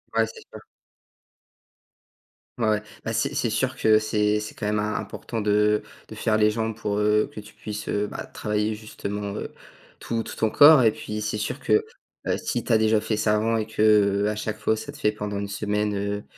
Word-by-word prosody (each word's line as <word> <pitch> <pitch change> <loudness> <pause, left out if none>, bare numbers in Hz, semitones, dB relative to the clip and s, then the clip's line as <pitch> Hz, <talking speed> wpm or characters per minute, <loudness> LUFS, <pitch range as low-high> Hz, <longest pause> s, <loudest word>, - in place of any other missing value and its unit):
Ouais, 115 - +4
c'est 115 - -11
sûr. - - -9 2.0
Ouais, 110 - +1
ouais. 105 0 +1 0.2
Bah, - - -2
c'est - - -1
c'est - - 0
sûr - - 0
que 110 -1 +5
c'est 105 -1 +1
c'est 105 - -7
quand 105 - -5
même 105 0 +1
im 105 +1 -1
important 115 -2 -5
de 105 0 +2 0.2
de - - -10
faire 110 -1 +1
les 105 0 +4
jambes 110 0 -2
pour, 105 -2 -2
heu, 105 0 +2
que - - -8
tu 105 - -12
puisses, 105 0 -7
heu, 105 0 0
bah - - -6
travailler 105 +1 -2
justement, 105 -1 -5
heu, - - -5 0.5
tout 115 -1 -2
tout - - -8
ton 110 - +1
corps 145 +1 +8
et 110 -2 +5
puis 105 0 -6
c'est 105 0 -2
sûr 110 +6 -3
que, 425 +1 +2 0.4
heu, - - +2
si 120 - -2
tu 120 - 0
as 110 - +5
déjà 110 0 +3
fait 110 0 -2
ça 105 0 +2
avant 115 +2 +1
et 110 0 -2
qu'à 105 -1 +3
chaque 105 0 -4
fois 110 - +1
ça 145 +6 -7
te 145 - -13
fait 105 -7 +2
pendant 105 -1 -4
une 100 0 -3
semaine, 105 +1 -1
heu, 100 +1 -2
105 Hz, 215 wpm, -25 LUFS, 105-110 Hz, 2.0 s, corps